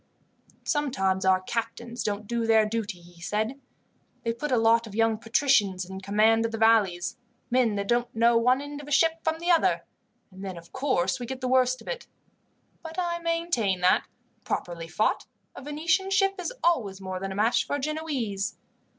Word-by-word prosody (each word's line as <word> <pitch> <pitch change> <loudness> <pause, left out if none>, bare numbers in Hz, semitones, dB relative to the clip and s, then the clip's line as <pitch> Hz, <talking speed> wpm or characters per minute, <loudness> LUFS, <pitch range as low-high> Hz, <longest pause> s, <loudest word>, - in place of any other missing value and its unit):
"Sometimes 195 -11 0
our 185 0 +4
captains 235 +3 -4
don't 210 0 -2
do 235 +1 -1
their 220 -1 +5
duty," 215 -4 -3
he 175 0 -17
said. 215 +9 -2 0.6
"They 230 - 0
put 290 +5 -4
a 250 - +3
lot 225 0 +3
of 205 - -10
young 225 -1 +2
patricians 225 -6 +2
in 190 +1 -8
command 215 +3 +3
of 230 - -1
the 225 - -3
galleys, 210 -6 +3 0.3
men 245 -4 +3
that 200 0 -2
don't 240 +1 0
know 230 +1 +4
one 250 +3 +3
end 290 0 -7
of 290 - -12
a - - -8
ship 325 +3 +3
from 320 0 0
the 345 +2 0
other, 335 - +3 0.5
and 190 +1 -11
then, 190 -3 -5
of 170 0 -13
course, 260 -5 0
we 245 - -5
get 260 +1 -5
the 255 - -2
worst 255 0 +2
of - - -21
it. - - -5 0.7
But 325 +1 -9
I 345 -1 -1
maintain 335 - 0
that, 180 +1 +3 0.4
properly 170 -1 -4
fought, 210 +6 0 0.3
a - - -8
Venetian 330 +7 0
ship 390 0 +2
is 360 - -3
always 225 - +1
more 185 -1 -5
than 195 +1 -4
a - - -5
match 220 +4 +2
for - - -1
a - - -2
Genoese." 270 -10 -3
230 Hz, 195 wpm, -27 LUFS, 200-285 Hz, 0.7 s, their